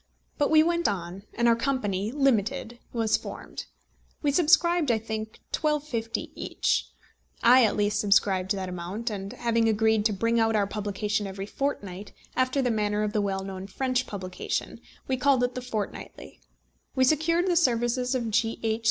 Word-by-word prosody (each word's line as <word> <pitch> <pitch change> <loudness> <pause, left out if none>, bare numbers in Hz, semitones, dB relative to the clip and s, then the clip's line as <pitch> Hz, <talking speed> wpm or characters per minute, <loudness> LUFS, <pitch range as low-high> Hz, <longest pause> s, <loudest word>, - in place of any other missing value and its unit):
But 290 - +3
we 310 0 +6
went 340 +1 +1
on, 190 0 -4
and 235 0 +2
our 230 - +5
company 220 -5 -1
limited 240 -3 0
was 225 -2 +1
formed. - - -8 0.6
We 290 - +3
subscribed, 340 0 +4
I 230 - +3
think, 220 0 -5
£1250 290 -7 -1
each. - - -1 0.6
I 250 +2 +7
at 210 - +1
least 210 0 +1
subscribed 195 -2 +2
that 190 -1 -4
amount, 180 +6 -4
and 195 -1 -5
having 230 -1 +1
agreed 220 0 +2
to 220 - +4
bring 230 +4 +1
out 225 0 +2
our 205 -2 +3
publication 205 0 -2
every 195 0 -5
fortnight, 205 -6 -4 0.2
after 255 +1 +1
the 245 - +1
manner 210 -1 0
of 210 0 -2
the 210 - +2
well 195 -1 -2
known 190 0 -6
French 255 +4 -1
publication, 185 -3 -4 0.3
we 260 - 0
called 260 -1 +3
it 245 0 0
The 255 - -4
Fortnightly. 215 - -6 0.5
We 260 - +3
secured 315 +5 +2
the 355 - +2
services 250 -3 +1
of 235 -3 -2
G. 225 +1 +1
H. 220 0 0
225 Hz, 170 wpm, -27 LUFS, 205-255 Hz, 0.6 s, I